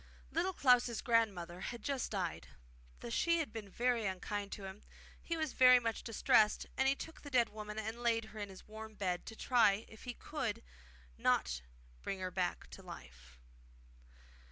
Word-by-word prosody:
Little 365 +3 0
Klaus' 250 -6 +4
grandmother 195 -8 +1
had 235 +2 -5
just 275 -3 -1
died. 175 - -3 0.5
Though 115 - -6
she 335 - +3
had 320 -3 -2
been 215 -3 -6
very 235 0 +1
unkind 200 +2 -3
to 200 - -7
him, 190 +2 -8 0.4
he 335 - -2
was 315 -3 -1
very 255 -1 +8
much 230 -2 -2
distressed, 225 -1 +3
and 265 - +2
he 270 - +4
took 320 +3 -8
the 290 - -8
dead 245 -4 +3
woman 210 0 -7
and 220 +2 -4
laid 230 -2 +2
her 220 0 -10
in 205 -1 -4
his 190 - -12
warm 220 0 -9
bed 180 -3 -2
to 225 - -7
try 225 -4 +3
if 220 - -13
he 245 -1 -4
could - - -3 0.6
not 60 0 +2 0.4
bring 195 - -3
her 185 0 -3
back 180 -1 -1
to - - -9
life. 60 0 -12
220 Hz, 180 wpm, -35 LUFS, 195-245 Hz, 0.6 s, very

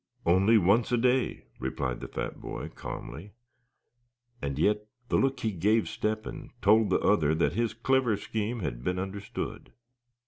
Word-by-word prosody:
"Only 95 +6 +5
once 105 +5 +3
a 120 - +3
day," 125 +2 +1 0.2
replied 65 -3 -2
the - - -6
fat - - -5
boy, - - -5
calmly; 85 +11 -8 1.1
and 70 -1 -3
yet 105 +6 +2 0.2
the - - +1
look 135 -1 +1
he 110 - 0
gave 105 +5 +2
Step 110 0 -2
hen 140 -3 -7
told 110 0 +5
the 95 - +4
other 80 -7 +3
that 85 - +1
his 115 +1 0
clever 125 -2 +2
scheme 110 +2 -3
had - - -4
been 90 +4 -1
understood. 95 +2 -5
105 Hz, 160 wpm, -29 LUFS, 90-115 Hz, 1.1 s, Only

